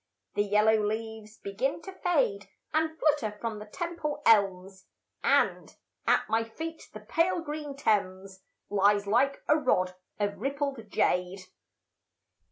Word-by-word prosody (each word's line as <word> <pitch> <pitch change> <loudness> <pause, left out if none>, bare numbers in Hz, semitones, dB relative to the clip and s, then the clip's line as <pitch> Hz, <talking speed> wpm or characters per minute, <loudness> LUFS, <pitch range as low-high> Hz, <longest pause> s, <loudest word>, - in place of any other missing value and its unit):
The - - +1
yellow 210 +1 +3
leaves 220 0 -4
begin 225 +10 -2
to 385 - -7
fade 405 +4 0 0.2
And 315 +1 0
flutter 285 -10 +1
from 225 -2 -4
the 210 - -9
Temple 335 - -4
elms, 195 -3 +3 0.4
And - - +2 0.3
at - - +3
my 225 +1 +1
feet 320 +9 -7
the - - -9
pale 345 +2 +1
green 295 -2 -5
Thames 195 -6 -1 0.3
Lies 205 0 +3
like 255 +7 +2
a 300 - +5
rod 185 -11 +1 0.3
of 205 -1 -1
rippled 275 -3 -3
jade. 180 0 0
220 Hz, 130 wpm, -29 LUFS, 205-295 Hz, 0.4 s, a